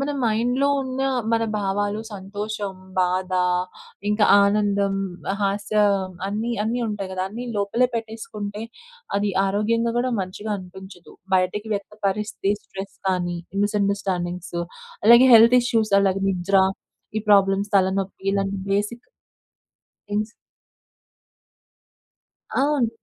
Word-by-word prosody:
మన 275 Hz, +1 st, -1 dB
మైండ్‌లో 245 Hz, +5 st, +1 dB
ఉన్న 260 Hz, 0 st, -3 dB, 0.3 s
మన 230 Hz, 0 st, +2 dB, 0.2 s
భావాలు, 205 Hz, +1 st, -1 dB
సంతోషం, 205 Hz, +1 st, -5 dB, 0.3 s
బాధ, 185 Hz, +1 st, 0 dB, 0.8 s
ఇంకా 210 Hz, 0 st, +3 dB, 0.2 s
ఆనందం, 200 Hz, -1 st, +1 dB, 0.5 s
హాస్యం 200 Hz, -1 st, +1 dB, 0.2 s
అన్ని, 220 Hz, +4 st, -2 dB
అన్ని 240 Hz, +3 st, -1 dB
ఉంటాయి 200 Hz, -3 st, -4 dB
కదా! 185 Hz, -, -2 dB
అన్ని 240 Hz, +4 st, -6 dB
లోపల 205 Hz, +5 st, +1 dB
పెట్టేసుకుంటే 220 Hz, -2 st, -5 dB, 0.5 s
అది 200 Hz, 0 st, +1 dB, 0.2 s
ఆరోగ్యంగా 230 Hz, +4 st, +1 dB
కూడా 255 Hz, +1 st, 0 dB
మంచిగా 200 Hz, +3 st, -5 dB
అనిపించదు. 185 Hz, -1 st, -12 dB, 0.2 s
బయటకి 185 Hz, +4 st, -1 dB
వ్యక్త 200 Hz, +1 st, -5 dB, 0.2 s
పరిస్థితే 205 Hz, 0 st, -1 dB
స్ట్రెస్ 195 Hz, +1 st, -8 dB
కానీ, 175 Hz, -2 st, 0 dB, 0.3 s
మిస్‌అండర్‌స్టాండింగ్స్, 190 Hz, -4 st, -2 dB, 0.5 s
అలాగే 235 Hz, +3 st, +8 dB
హెల్త్ 230 Hz, +2 st, +8 dB
ఇష్యూస్, 225 Hz, -4 st, 0 dB
అలాగే 195 Hz, 0 st, +1 dB
నిద్ర 190 Hz, +2 st, +1 dB, 0.6 s
ఈ 215 Hz, -, +1 dB
ప్రాబ్లమ్స్ 195 Hz, 0 st, +4 dB
తలనొప్పి 190 Hz, 0 st, +1 dB
ఇలాంటి 195 Hz, 0 st, -1 dB
బేసిక్ 205 Hz, +4 st, 0 dB, 1.2 s
ఇన్స్ 210 Hz, +1 st, 0 dB, 2.3 s
అవును. 280 Hz, -4 st, +2 dB
205 Hz, 105 wpm, -23 LUFS, 195-220 Hz, 2.3 s, అలాగే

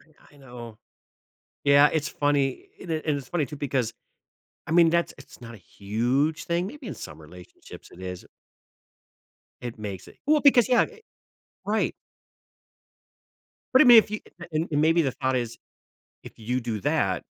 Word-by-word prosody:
I 155 Hz, -2 st, -24 dB
I -, -, -19 dB
know. 120 Hz, -5 st, -11 dB, 0.9 s
Yeah, 140 Hz, +1 st, +6 dB
it's 155 Hz, -2 st, -1 dB
funny 145 Hz, -2 st, -1 dB
and 170 Hz, -, -5 dB
i -, -, +1 dB
it's 145 Hz, -4 st, -2 dB
funny 155 Hz, -5 st, -1 dB
too 150 Hz, -, -9 dB
because, 130 Hz, -5 st, -1 dB, 0.7 s
I -, -, -4 dB
mean 170 Hz, -1 st, +6 dB
that's 170 Hz, 0 st, 0 dB
it's 135 Hz, -, -15 dB
not 115 Hz, -1 st, -10 dB
a -, -, -10 dB
huge 120 Hz, -, -1 dB
thing, 175 Hz, 0 st, -1 dB
maybe 275 Hz, +4 st, -9 dB
in -, -, -5 dB
some 75 Hz, 0 st, -10 dB
relationships 90 Hz, +3 st, -14 dB
it 90 Hz, -, -14 dB
is 90 Hz, -1 st, -7 dB, 1.4 s
it 120 Hz, -2 st, -7 dB
makes 100 Hz, -4 st, -7 dB
it -, -, -16 dB
well, 300 Hz, 0 st, +4 dB
because, 260 Hz, -4 st, +5 dB
yeah 245 Hz, -2 st, +5 dB
it 450 Hz, -1 st, -8 dB, 0.6 s
right. 215 Hz, +2 st, 0 dB, 1.8 s
But 260 Hz, -, +8 dB
I -, -, +5 dB
mean 240 Hz, -2 st, +10 dB
if 215 Hz, -, +3 dB
you 215 Hz, -, -4 dB, 0.3 s
and 155 Hz, +2 st, -1 dB
and 145 Hz, -1 st, +1 dB
maybe 165 Hz, +2 st, +4 dB
the 135 Hz, -3 st, -1 dB
thought 130 Hz, -2 st, -1 dB
is, 120 Hz, -2 st, -3 dB, 0.6 s
"If -, -, -11 dB
you 125 Hz, +3 st, -2 dB
do 115 Hz, -4 st, -4 dB
that, -, -, 0 dB
140 Hz, 170 wpm, -25 LUFS, 115-170 Hz, 1.8 s, mean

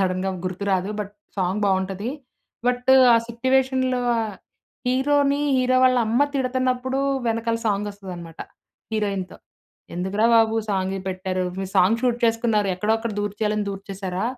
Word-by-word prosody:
సడన్‌గా 185 Hz, 0 st, 0 dB, 0.2 s
గుర్తురాదు. 190 Hz, +1 st, -1 dB
But 205 Hz, -1 st, -6 dB, 0.3 s
song 190 Hz, +3 st, 0 dB
బావుంటది. 190 Hz, +3 st, -1 dB, 0.6 s
But 250 Hz, +1 st, +1 dB, 0.2 s
ఆ -, -, +6 dB
సిట్యువేషన్‌లో 260 Hz, +1 st, +1 dB, 0.2 s
ఆ 230 Hz, -, +1 dB, 0.7 s
హీరో‌ని 280 Hz, +2 st, +2 dB, 0.2 s
హీరో‌‌ 255 Hz, 0 st, +3 dB
వాళ్ళ 255 Hz, 0 st, +4 dB
అమ్మ 235 Hz, +5 st, +1 dB
తిడతన్నప్పుడు 260 Hz, 0 st, 0 dB, 0.3 s
వెనకాల 230 Hz, 0 st, -1 dB
సాంగ్ 205 Hz, 0 st, 0 dB
వస్తదన్నమాట 180 Hz, -5 st, -9 dB, 0.5 s
హీరోయిన్‌తో. 200 Hz, -4 st, -2 dB, 0.6 s
ఎందుకురా 190 Hz, +5 st, 0 dB
బాబు 225 Hz, -1 st, +4 dB, 0.2 s
సాంగ్ 190 Hz, -1 st, -1 dB
పెట్టారు 185 Hz, 0 st, -2 dB
మీరు 190 Hz, -1 st, -4 dB
సాంగ్ 220 Hz, +6 st, +4 dB
షూట్ 245 Hz, -2 st, +2 dB
చేసుకున్నారు 225 Hz, -3 st, +1 dB
ఎక్కడో 210 Hz, +4 st, +1 dB
అక్కడ 225 Hz, 0 st, -4 dB
దూర్చేయాలని 210 Hz, +1 st, -1 dB
దూర్చేశారా? 195 Hz, -1 st, -5 dB
210 Hz, 125 wpm, -23 LUFS, 190-250 Hz, 0.7 s, ఆ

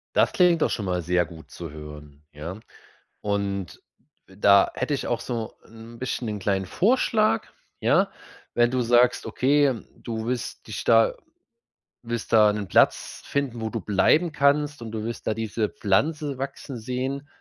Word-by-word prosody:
Das -, -, +4 dB
klingt 175 Hz, -3 st, +4 dB
doch -, -, +3 dB
schon 105 Hz, -, -3 dB
mal 90 Hz, -1 st, -1 dB
sehr 90 Hz, +1 st, +1 dB
gut 80 Hz, 0 st, -13 dB
zu 85 Hz, -4 st, -8 dB
hören, 75 Hz, -1 st, -11 dB
ja. 80 Hz, +7 st, -7 dB, 0.6 s
Und, 100 Hz, -3 st, -3 dB, 0.5 s
da 100 Hz, +1 st, +4 dB
hätte -, -, -2 dB
ich 140 Hz, -, -2 dB
auch 120 Hz, -, -1 dB
so 115 Hz, -3 st, -4 dB
'n 115 Hz, +1 st, -12 dB
bisschen 130 Hz, -1 st, -3 dB
‘nen 105 Hz, -2 st, -4 dB
kleinen 95 Hz, 0 st, 0 dB
Vorschlag, 215 Hz, -, +2 dB, 0.3 s
ja? -, -, +3 dB, 0.4 s
Wenn 120 Hz, 0 st, +3 dB
du 130 Hz, -, +1 dB
sagst, 120 Hz, +1 st, +3 dB
okay, 135 Hz, -2 st, +2 dB
du 110 Hz, -2 st, -5 dB
wirst 125 Hz, 0 st, -4 dB
dich -, -, -5 dB
da -, -, +5 dB, 0.9 s
wirst 115 Hz, -1 st, -4 dB
da 105 Hz, -1 st, +7 dB
'nen 105 Hz, -2 st, -4 dB
Platz -, -, +2 dB
finden, 135 Hz, -5 st, -2 dB
wo 110 Hz, -, -2 dB
du 115 Hz, -1 st, -4 dB
bleiben 155 Hz, -, +3 dB
kannst 145 Hz, -1 st, +2 dB
und 115 Hz, -1 st, -7 dB
du 110 Hz, -1 st, -3 dB
wirst 115 Hz, +1 st, -6 dB
da 110 Hz, -, +2 dB
diese 110 Hz, 0 st, -2 dB
Pflanze 140 Hz, +7 st, 0 dB
wachsen 135 Hz, -1 st, -6 dB
sehen 130 Hz, +4 st, -3 dB
115 Hz, 160 wpm, -25 LUFS, 100-135 Hz, 0.9 s, da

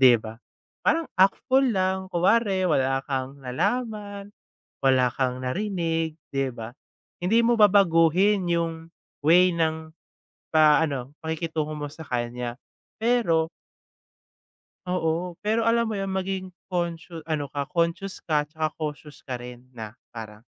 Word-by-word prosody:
di 125 Hz, -2 st, +9 dB
ba, 110 Hz, 0 st, -9 dB, 0.5 s
parang 320 Hz, +2 st, +2 dB
act 190 Hz, +1 st, +5 dB
fool 265 Hz, 0 st, +4 dB
lang, 190 Hz, 0 st, 0 dB
kunware, 190 Hz, +1 st, +3 dB
wala 135 Hz, -3 st, +2 dB
kang 135 Hz, 0 st, -3 dB
nalaman, 205 Hz, -, -2 dB, 0.5 s
wala 130 Hz, -1 st, +5 dB
kang 130 Hz, -1 st, -1 dB
narinig, 165 Hz, 0 st, -1 dB, 0.2 s
di 135 Hz, -1 st, 0 dB
ba? 115 Hz, 0 st, -8 dB, 0.5 s
Hindi 210 Hz, +7 st, +3 dB
mo 240 Hz, +1 st, +4 dB
babaguhin 190 Hz, -1 st, +4 dB
yung 165 Hz, -1 st, -2 dB, 0.4 s
way 180 Hz, +3 st, +6 dB
ng 160 Hz, -1 st, -1 dB, 0.6 s
pa 155 Hz, 0 st, +6 dB
ano 140 Hz, -3 st, -4 dB
pakikitungo 160 Hz, -1 st, -2 dB
mo 145 Hz, -1 st, -4 dB
sa 160 Hz, -, -9 dB
kanya. 120 Hz, 0 st, -3 dB, 0.4 s
Pero 220 Hz, -9 st, +2 dB, 1.4 s
Oo, 175 Hz, 0 st, -1 dB
pero 220 Hz, +2 st, +1 dB
alam 230 Hz, -1 st, +3 dB
mo 205 Hz, -, -2 dB
yun, 195 Hz, -1 st, -2 dB
maging 190 Hz, -1 st, -3 dB, 0.2 s
conscio 170 Hz, -2 st, -3 dB
ano 150 Hz, -3 st, -2 dB
ka, 140 Hz, -1 st, -3 dB
conscious 170 Hz, +2 st, -1 dB
ka 150 Hz, -2 st, +1 dB
tsaka 155 Hz, 0 st, -2 dB
cautious 150 Hz, -1 st, -6 dB
ka 130 Hz, -, -3 dB
rin 125 Hz, 0 st, -10 dB
na 110 Hz, -1 st, -8 dB, 0.2 s
parang, 110 Hz, -1 st, -9 dB
165 Hz, 130 wpm, -25 LUFS, 140-190 Hz, 1.4 s, di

